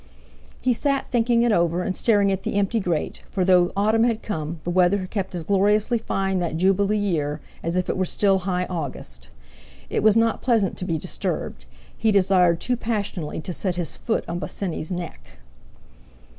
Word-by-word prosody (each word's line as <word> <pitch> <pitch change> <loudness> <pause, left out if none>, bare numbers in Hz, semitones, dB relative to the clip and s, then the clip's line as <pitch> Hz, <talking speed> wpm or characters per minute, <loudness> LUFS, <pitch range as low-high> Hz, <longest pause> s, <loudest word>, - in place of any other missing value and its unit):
He 255 - +2
sat 275 +3 -1
thinking 235 -1 +3
it 240 - +3
over, 175 -2 +2
and 185 - -2
staring 205 -4 +3
at 190 0 -1
the - - -3
empty 205 +3 +1
grate, 175 -6 -2
for 185 -3 0
though 180 -1 +4
autumn 215 +3 +3
had 230 -2 0
come, 160 -4 -4
the 175 - -2
weather 185 +2 +3
kept 190 -1 -4
as 170 - -3
gloriously 210 +5 +2
fine 195 -3 -1
that 170 -2 -2
jubilee 195 +3 +2
year 155 -7 -1 0.2
as 170 +2 -2
if 180 - 0
it - - -1
were 185 - 0
still 195 +1 +2
high 180 -1 -1
August. 130 - -5 0.6
It - - 0
was 215 +1 +5
not 225 0 +2
pleasant 225 -7 +2
to 180 - -3
be 165 -3 -1
disturbed; 65 - -4 0.3
he 220 - +1
desired 185 -4 +4
too 250 +7 0
passionately 200 -9 -3
to 180 - -4
set 185 0 -2
his 175 -3 -3
foot 230 - -2
on 170 +1 -3
Bosinney's 175 -4 -4
neck. 175 - -7
190 Hz, 185 wpm, -23 LUFS, 175-210 Hz, 0.6 s, was